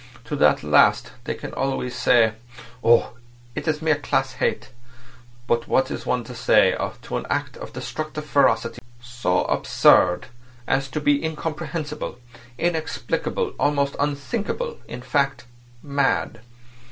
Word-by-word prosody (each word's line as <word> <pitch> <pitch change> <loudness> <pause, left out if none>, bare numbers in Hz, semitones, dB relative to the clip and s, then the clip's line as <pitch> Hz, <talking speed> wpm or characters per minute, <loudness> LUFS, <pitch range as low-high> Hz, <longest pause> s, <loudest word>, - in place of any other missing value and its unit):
To - - -4
that - - +4
last 75 -1 +4
they - - -2
can - - -8
always 135 -2 -2
say: 120 -2 +4 0.5
'Oh! 120 +1 +4 0.4
it's 155 +4 -2
mere 155 -2 +3
class 135 -2 0
hate.' 130 - -2 0.7
But 120 -1 0
what 130 - +2
is - - -5
one 125 -1 0
to 125 - -9
say 120 - +4 0.3
to - - -3
an - - -5
act - - -2
of - - -8
destructive 155 -1 -5
ferocity 115 -5 +2 0.2
so 120 -6 -1
absurd 90 - +4 0.4
as 135 +1 0
to 150 +3 -3
be 145 0 +2
incomprehensible, 155 -2 -4 0.4
inexplicable, 175 - -1
almost 140 -1 +1
unthinkable; 205 - -2
in 125 - -8
fact, 140 +1 0 0.4
mad? 140 -4 0
140 Hz, 130 wpm, -23 LUFS, 120-150 Hz, 0.7 s, that